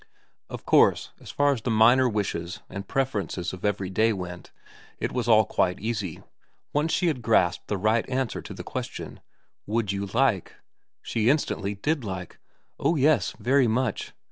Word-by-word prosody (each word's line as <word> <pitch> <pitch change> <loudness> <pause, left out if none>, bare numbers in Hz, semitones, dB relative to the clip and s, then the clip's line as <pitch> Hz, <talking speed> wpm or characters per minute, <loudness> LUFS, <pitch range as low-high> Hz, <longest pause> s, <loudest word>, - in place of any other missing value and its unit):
Of - - -8
course - - +4
as - - -12
far 145 0 +2
as 120 - -5
the 120 - -3
minor 120 +3 +5
wishes 100 -5 -3
and 95 0 -6
preferences 105 - -2
of 95 - -9
every 100 -2 -1
day 110 +3 +3
went 90 -2 -7 0.5
it - - -2
was 125 -1 -2
all 110 -2 +6
quite 90 -1 0
easy, 105 -6 -4 0.5
once 150 +3 +1
she 180 - +1
had 150 -7 0
grasped 100 -6 +2
the 105 - -1
right 110 +5 +1
answer 130 -2 -2
to - - -9
the - - -7
question, - - -6 0.2
' - - -48
Would 110 -1 0
you 100 0 -3
like 115 -4 +1
1 - - -26 0.2
' - - -60
She 115 +1 +1
instantly 105 -8 0
did 145 +7 -1
like. 95 -4 -6 0.2
' - - -45
Oh 170 - +2
yes 150 +1 +2
very 130 0 +3
much 115 0 -1
110 Hz, 185 wpm, -26 LUFS, 100-130 Hz, 0.5 s, all